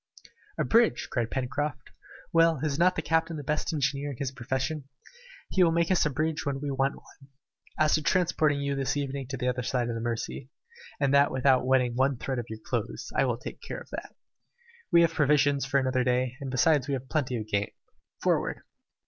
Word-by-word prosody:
"A - - +1
bridge!" 230 0 +3
cried 120 -3 -1
Pencroft. 135 +3 -3 0.4
"Well, 165 -2 +4
is 150 -1 -1
not 185 +2 +4
the 160 - -2
captain 165 +1 0
the 145 - -6
best 150 +4 -1
engineer 140 -1 -1
in 135 - -6
his 135 -1 -3
profession? 130 +3 -3 0.7
He 185 - +4
will 165 - +4
make 170 +2 +1
us 180 -4 +3
a - - -1
bridge 155 +3 -1
when 140 -1 -2
we 145 0 -3
want 135 +1 0
one. 135 -1 -18 0.5
As 155 0 +3
to 155 - +3
transporting 155 -4 +2
you 140 0 -1
this 135 0 -1
evening 140 -2 -3
to 135 +1 -4
the 125 - -2
other 125 0 0
side 125 0 -1
of - - -2
the 115 - -4
Mercy, 120 +2 -4 0.5
and 140 -1 +2
that 140 0 +5
without 130 -1 +2
wetting 125 -2 +3
one 130 +1 +1
thread 130 +1 -3
of 120 - -5
your 110 - -6
clothes, - - -3
I - - +3
will - - 0
take - - -9
care - - -6
of - - -14
that. - - -7 0.8
We 170 -1 +7
have 165 -1 +3
provisions 145 -2 +3
for 140 0 +2
another 130 -1 +1
day, 125 0 0
and 135 - -4
besides 135 +1 +3
we 140 - 0
can 130 - -4
get 130 - -23
plenty 130 -6 0
of 110 - -4
game. 100 -1 -1 0.5
Forward!" - - +1
140 Hz, 215 wpm, -28 LUFS, 130-155 Hz, 0.8 s, We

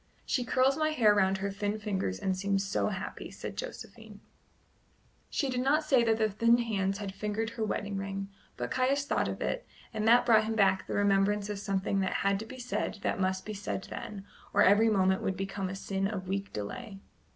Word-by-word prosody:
"She 255 - 0
curls 260 +3 +2
my 310 0 +2
hair 230 -9 +4
round 190 -1 +3
her 200 +1 -2
thin 205 +1 -2
fingers 195 - -2
and 190 - -1
seems 195 +1 0
so 195 - 0
happy," 195 -1 -5
said - - -7
Josephine. - - -8 1.1
She 280 - 0
did 255 -1 -1
not 285 +5 +2
say 265 -5 +4
that 225 -1 +2
the 220 -1 +3
thin 230 +3 +3
hands 200 -5 -1
had 200 -2 -5
fingered 215 +2 -2
her 230 -1 -3
wedding 205 -1 -2
ring; 195 0 -4 0.3
but - - -4
Caius 270 +2 +1
thought - - 0
of - - -5
it, - - -2 0.3
and 215 0 -1
that 240 +2 +6
brought 220 -3 +5
him 220 0 -2
back 190 -3 +3
the - - -3
remembrance 205 +1 +2
of 205 - -4
something 195 -1 -1
that 190 - 0
had 195 0 +3
to 220 - -7
be 255 - -9
said 245 -3 -3
that - - 0
must 185 0 0
be 215 - -4
said 195 -1 -4
then, 200 -2 -6 0.3
or - - +6
every 210 +4 +6
moment 190 -2 +2
would 190 - -1
become 195 0 -3
a 190 - -5
sin 195 0 -2
of 195 -3 -5
weak 195 +1 -3
delay. 195 - -6
205 Hz, 210 wpm, -30 LUFS, 195-230 Hz, 1.1 s, that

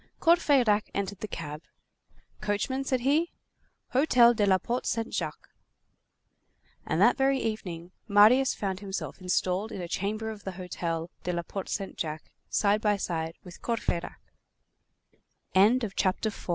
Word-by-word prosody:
Courfeyrac 275 -11 +4
entered 200 -1 -3
the 215 - -4
cab. 155 -5 -6 0.8
"Coachman," 210 +6 -1
said 260 -2 0
he, 300 +7 +2 0.6
"hotel 250 -3 +5
de 210 -3 +1
la 190 -1 +5
Porte 240 +7 -3
Saint 225 -1 -2
Jacques." - - -4 1.4
And - - 0
that - - +5
very 270 0 +3
evening, 180 -7 -4 0.2
Marius 220 +6 +6
found 190 -2 -3
himself 195 -1 -5
installed 185 +3 0
in - - -6
a 175 - -4
chamber 215 +5 -2
of 210 -2 -10
the 190 - -5
hotel 175 -2 -4
de 180 - -2
la 170 0 -2
Porte 195 +2 -6
Saint 195 -2 -3
Jacques 155 -1 -4 0.2
side 205 0 +3
by 210 -1 +2
side 165 -3 -3
with 180 -1 -12
205 Hz, 130 wpm, -28 LUFS, 180-235 Hz, 1.4 s, Marius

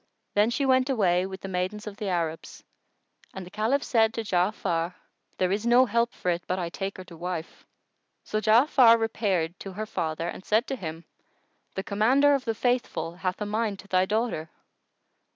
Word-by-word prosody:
Then 210 +2 +4
she 255 +4 0
went 260 0 +3
away 185 -7 +2
with 190 0 -8
the - - -6
maidens 190 +3 -3
of 210 -1 -7
the 210 - -4
Arabs, 165 -3 -3 0.7
and 190 -1 -6
the 180 - -13
Caliph 230 +8 0
said 225 -2 +2
to 230 - -2
Ja'afar, 180 -3 0 0.4
"There 185 0 +1
is 205 +2 0
no 245 +2 +6
help 235 0 +1
for 180 - -2
it 170 0 -2
but 185 - -1
I 175 -2 -2
take 195 +3 -5
her 185 - -7
to 170 -2 -13
wife." 170 -1 -6 0.6
So 215 - -2
Ja'afar 230 +1 +6
repaired 195 -7 -1
to 195 - -8
her 215 +3 -4
father 165 -5 -3
and 180 - -6
said 220 +5 +2
to 270 - -1
him, 165 -6 -7 0.7
"The 190 - -2
Commander 255 +9 +3
of 275 -2 0
the 225 -1 -1
Faithful 245 -8 -1
hath 185 0 -2
a - - 0
mind 210 -1 -1
to 200 - -19
thy 185 -1 +2
daughter." 210 -7 -1
205 Hz, 190 wpm, -27 LUFS, 180-230 Hz, 0.7 s, no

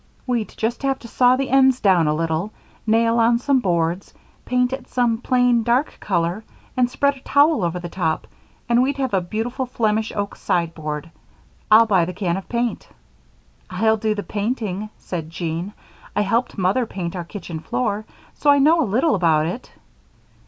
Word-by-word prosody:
We'd 240 -4 -1
just 230 +2 -2
have 270 -1 0
to 235 - -12
saw 250 +2 +4
the 270 0 -2
ends 265 -1 +5
down 180 -6 +3
a 150 - +1
little, 165 +5 -1 0.4
nail 230 +1 +3
on 230 +1 +4
some 270 +2 +2
boards, 175 -3 -1 0.3
paint 250 0 +1
it 265 -1 -6
some 240 -3 +1
plain, 245 -1 +2
dark 240 +6 0
color, 180 +2 -1 0.3
and 250 -1 +2
spread 280 +2 +1
a - - -14
towel 285 - +3
over 170 0 -1
the 175 - -6
top, 165 -3 -2 0.4
and 235 +1 +3
we'd 275 +2 0
have 265 -4 -2
a 190 - +2
beautiful 230 +8 -3
Flemish 220 -3 0
oak 200 -1 -3
sideboard. 160 -2 -2 0.6
I'll 220 +2 +7
buy 190 -6 +3
the 180 - -5
can 180 -2 -1
of 190 - -7
paint." 240 -1 -2 0.8
"I'll 220 +4 +2
do 215 0 0
the 205 - -4
painting," 215 -2 -3
said 165 -4 -6
Jean. 165 +3 -4 0.4
"I - - +2
helped 225 +5 0
Mother 195 +6 +1
paint 180 -3 -5
our 175 - -3
kitchen 170 -2 -7
floor, 210 +4 -2 0.3
so 295 - 0
I 285 - +7
know 315 +4 +4
a 255 - -1
little 265 +9 +2
about 160 -5 +2
it." 185 +10 -5
220 Hz, 180 wpm, -21 LUFS, 180-250 Hz, 0.8 s, I'll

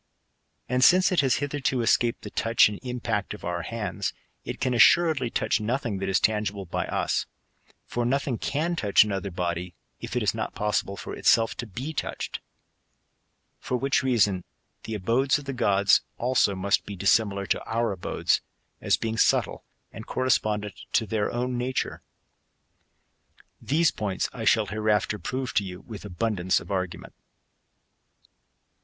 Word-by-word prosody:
And 125 +1 +1
since 185 +5 +6
it 180 - +2
has 135 -3 +3
hitherto 145 -3 -1
escaped 115 +1 +2
the - - -7
touch 115 0 +4
and 105 - -7
impact 125 -2 -3
of - - -11
our - - -2
hands, - - -3 0.3
it - - -6
can 130 - 0
a^ssuredly 140 0 +4
touch 115 - 0
nothing 115 -2 -2
that 95 0 -2
id 95 - 0
tangible 105 -2 +1
by 85 - -3
us; - - -1 0.6
for 120 - -2
nothing 130 0 0
can 165 +4 -1
touch 105 -11 +4
another 100 -1 -3
body, 90 -1 -3 0.2
if - - -6
it - - +1
is - - +2
not - - -4
possible 105 -1 -1
for - - -6
itself 115 0 +3
to 120 - -5
be 130 - -5
touched. - - -4 1.2
For 125 - -2
which 135 +2 +1
reason 105 -8 +2 0.4
the 110 - -4
abodes 120 +8 +2
of 145 - -9
the 135 - -4
gods, 100 -5 +3 0.2
also, 120 -5 +2
must 100 +1 +1
be 100 - -5
dissimilar 100 +1 +2
to - - -1
our 115 0 0
abodes, 95 -3 0 0.4
as - - +2
being 110 0 -3
subtle, - - +2 0.3
and - - -10
correspondent 110 -5 0
to 115 - +3
their 105 -1 -1
own 125 0 -2
nature.^ 130 +1 -2 1.6
These 155 +3 +2
points 100 -3 -2
I 115 - -5
shall 110 0 +4
hereafter 105 0 0
prove 130 +8 -3
to 100 - +2
you 90 -1 -7
with 110 -3 -10
abundance 95 -1 0
of - - -10
argument. 95 -2 -3
110 Hz, 155 wpm, -26 LUFS, 100-130 Hz, 1.6 s, since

